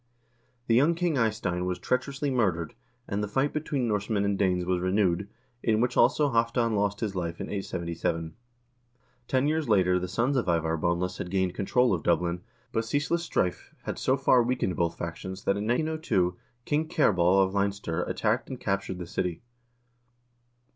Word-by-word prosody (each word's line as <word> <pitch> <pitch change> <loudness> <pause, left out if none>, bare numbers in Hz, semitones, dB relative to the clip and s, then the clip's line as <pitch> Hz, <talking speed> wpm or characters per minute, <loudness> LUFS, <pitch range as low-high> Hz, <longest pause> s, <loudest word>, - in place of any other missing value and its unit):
The 115 - +1
young 145 +8 +4
King 170 -2 0
Eystein 105 -7 0
was 90 -1 -1
treacherously 135 +2 -1
murdered, 95 - 0 0.3
and 100 +1 -2
the - - -1
fight 135 +7 0
between 145 -5 -1
Norsemen 105 -1 0
and 100 0 +1
Danes 90 -2 +1
was 90 0 0
renewed, 95 0 +1 0.3
in 110 -1 +2
which 125 +1 +1
also 140 +4 +4
Halvdan 115 0 +1
lost 100 +1 0
his 105 -4 -2
life 85 -2 -3
in - - -5
877. 85 -4 -3 0.9
Ten 130 +2 +2
years 155 -3 0
later 90 -3 +4
the 90 - -3
sons 120 +9 0
of 120 - 0
Ivar 80 -1 +1
Boneless 85 +3 -1
had 90 - -4
gained 95 -1 0
control 125 +5 +2
of 85 - -1
Dublin, 85 +1 +1 0.3
but 115 - 0
ceaseless 145 +8 0
strife 90 - -2
had - - -4
so 130 - +2
far 130 -2 +4
weakened 120 -6 0
both 85 -1 -1
factions 95 +3 -6
that 100 - +2
in 105 +1 -3
902 120 - +1 0.3
King 155 +2 0
Cerbalh 95 - +4
of 95 - -5
Leinster 100 -4 -1
attacked 110 +3 -1
and 130 -2 -6
captured 100 -2 -2
the 90 - -6
city. 90 +1 -3
100 Hz, 170 wpm, -28 LUFS, 90-125 Hz, 0.9 s, young